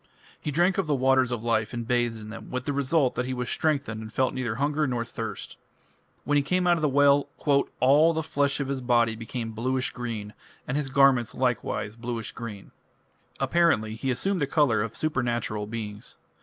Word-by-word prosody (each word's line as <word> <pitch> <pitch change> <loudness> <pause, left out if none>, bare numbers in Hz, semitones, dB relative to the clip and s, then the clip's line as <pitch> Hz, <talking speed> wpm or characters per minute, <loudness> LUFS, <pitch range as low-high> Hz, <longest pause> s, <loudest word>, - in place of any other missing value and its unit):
He - - -3
drank 175 +6 +2
of 190 - 0
the 150 - +2
"waters 130 -1 +3
of 120 -2 -3
life" 115 -1 0
and 120 -1 -4
bathed 120 -1 +1
in 110 -1 -9
them, 115 - -9
with 130 +1 -4
the 145 - -1
result 140 0 +2
that 125 - -2
he 130 - -2
was 125 0 -3
strengthened 140 -8 -1
and 110 0 -8
felt 130 +3 +1
neither 125 -4 -2
hunger 145 +3 0
nor 120 -2 -1
thirst. 115 - -6 0.7
When 145 0 +2
he - - +4
came 180 +6 0
out 175 -1 +5
of 165 - -3
the 150 - +2
well 140 0 +4 0.5
"all 145 +5 +5
the 160 -1 -2
flesh 145 -2 0
of 140 - -2
his 135 -1 -2
body 120 -2 +2
became 115 0 -5
bluish 130 +4 -1
green 110 -4 -5 0.3
and 125 - -2
his 145 -2 -1
garments 135 -3 +4
likewise 120 -4 -1
bluish 115 -1 -4
green". 105 -4 -8 0.7
Apparently 160 -11 +2
he 115 +4 -3
assumed 185 +8 0
the 140 - +1
colour 135 -8 +2
of 115 +1 -4
supernatural 120 -8 -1
beings. 105 -2 -6
130 Hz, 195 wpm, -26 LUFS, 115-145 Hz, 0.7 s, out